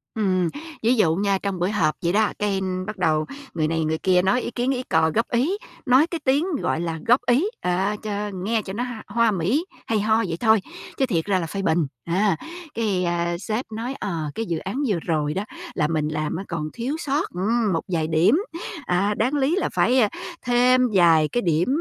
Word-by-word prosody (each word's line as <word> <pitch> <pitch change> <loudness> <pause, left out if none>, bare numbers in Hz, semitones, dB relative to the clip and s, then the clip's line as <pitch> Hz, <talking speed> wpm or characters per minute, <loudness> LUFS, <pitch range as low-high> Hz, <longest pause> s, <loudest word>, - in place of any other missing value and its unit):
Ừm, 185 -5 +1 0.3
ví 240 +3 +4
dụ 165 -7 +3
nha, 200 0 +1
trong 195 -3 -2
buổi 180 +3 +1
họp 160 -8 +1
vậy 170 +2 +1
đó, 215 0 +3
cái 200 -2 0 0.3
bắt 210 -1 -5
đầu 155 -3 +1 0.3
người 155 -2 0
này 160 0 0
người 160 +1 0
kia 180 0 +3
nói 240 +7 +2
ý - - -4
kiến 245 +2 0
ý 255 -1 -2
cò 160 -7 +2
góp 230 - +1
ý, 275 +12 +1 0.3
nói 265 +5 +5
cái 335 -1 -4
tiếng, 280 +6 +3 0.2
gọi - - 0
là, 165 -1 -3
góp 245 +3 +6
ý, 250 +8 +4 0.2
à, 190 +3 0
cho 210 -1 -3
nghe 210 +4 -1
cho 190 - -7
nó 235 +4 -2
h 250 - -4 0.2
hoa 235 -1 +2
mỹ 205 - 0 0.2
hay 220 -2 +1
ho 220 +2 +2
vậy 165 - -3
thôi, 220 -3 +4 0.4
chứ 270 - +3
thiệt 170 -10 -1
ra 195 -2 +2
là 165 - -3
phê 195 +4 -4
bình, 165 -4 +1 0.2
à. 190 +3 +2 0.4
Cái, 205 -5 0
ờ, 170 0 0
sếp 220 +5 -2
nói, 230 +4 -4
ờ, 160 -6 -3
cái 225 - -2
dự 170 -5 -2
án 205 - -3
vừa 200 -7 +1
rồi 150 -3 0
đó 190 +4 -2 0.3
là 150 -4 +1
mình 155 -1 0
làm 155 0 -2
á 185 - -4
còn 155 -2 -3
thiếu 250 +6 -3
sót, 285 0 -1
ưm, 210 +3 0
một 165 - 0
vài 165 -4 0
điểm, 165 - +4 0.5
à, 195 +2 +1
đáng 245 +6 +1
lý 290 +3 +2
là 390 - 0
phải, 255 +2 +3
à, 215 -4 +4 0.4
thêm 250 +1 +4
vài 165 -4 +5
cái 240 - -1
điểm, 170 -3 +1
200 Hz, 225 wpm, -23 LUFS, 170-235 Hz, 0.5 s, góp